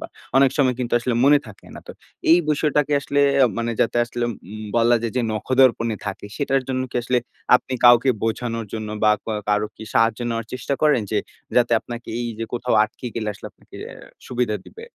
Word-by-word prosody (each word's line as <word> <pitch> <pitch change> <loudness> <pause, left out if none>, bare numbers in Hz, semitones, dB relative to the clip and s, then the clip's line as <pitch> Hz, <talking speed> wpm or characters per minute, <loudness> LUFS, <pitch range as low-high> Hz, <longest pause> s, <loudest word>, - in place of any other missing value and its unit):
বা - - -6 0.3
অনেক 135 0 +5
সময় 130 -3 +3
কিন্তু 125 -1 -4
আসলে 120 0 -2
মনে 145 +1 +6
থাকে 105 - -14
না। - - -9
তো - - -8 0.4
এই 170 - +7
বিষয়টাকে 150 -1 +1
আসলে 145 0 0 0.2
আ - - +5
মানে 115 0 -1
যাতে 115 - +1
আসলে 120 0 -5 0.3
উম 110 0 -7
বলা 120 +1 +4
যায় 115 - -2
যে 125 - +2
নখদর্পণে 115 -1 +2
থাকে 105 0 -5
সেটার 135 -2 0
জন্য 130 0 -1
কি - - -4
আসলে 125 +1 +1 0.4
আপনি 130 - -9
কাউকে 120 +2 +7
বোঝানোর 115 0 -2
জন্য 110 -1 -4 0.2
বা 105 - +6
ক - - -61 0.2
কারো 105 0 +1
কি 110 - -8
সাহায্য 115 0 +3
নেওয়ার 115 -1 -4
চেষ্টা 130 +2 -2
করেন? 150 -7 +4
যে - - +1 0.4
যাতে 120 -1 +3
আপনাকে 120 0 -9
এই 120 - -2
যে 115 - -2
কোথাও 120 -1 -1
আটকে 120 +3 -9
গেলে 110 -2 -3
আসলে - - -10
আপনাকে - - -17 0.5
সুবিধা 120 -4 -1
দিবে? 455 +1 -11
120 Hz, 200 wpm, -22 LUFS, 115-130 Hz, 0.5 s, এই